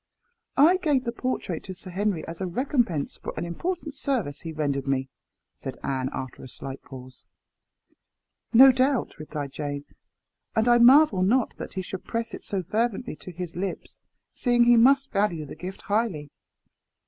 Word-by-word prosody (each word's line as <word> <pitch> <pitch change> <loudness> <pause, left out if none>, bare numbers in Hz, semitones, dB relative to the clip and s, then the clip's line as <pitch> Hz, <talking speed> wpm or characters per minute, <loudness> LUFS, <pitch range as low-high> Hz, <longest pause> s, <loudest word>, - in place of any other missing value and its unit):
"I 320 +7 +6
gave 295 -8 +1
the 235 - -2
portrait 235 -8 -3
to 185 - -7
Sir 185 0 -8
Henry 195 -2 -1
as 165 +2 -7
a 185 - -1
recompense 225 - -1
for - - -6
an 165 - -2
important 320 - -4
service 250 - -1
he 165 - -6
rendered 140 -3 -2
me," 135 -1 0 0.4
said - - -7
Anne, 130 -1 -1
after 130 -2 -6
a - - -9
slight 135 +1 -7
pause. 130 -1 -12 1.2
"No 265 +3 +9
doubt," 260 - 0
replied 150 -2 -5
Jane; 145 -1 -4 0.7
"and 220 +2 +2
I 240 0 +6
marvel 250 -4 +7
not 230 +6 +2
that - - -7
he 190 - -3
should 185 +1 -7
press 230 0 -3
it - - -7
so 195 -2 -3
fervently 225 +3 -1
to 185 - -9
his 175 0 -6
lips, 185 +1 -5 0.3
seeing 240 -1 +3
he 240 0 +6
must 270 +4 +5
value 195 -7 0
the 140 - -9
gift 185 +3 -8
highly. 200 -9 -1
195 Hz, 170 wpm, -26 LUFS, 155-245 Hz, 1.2 s, No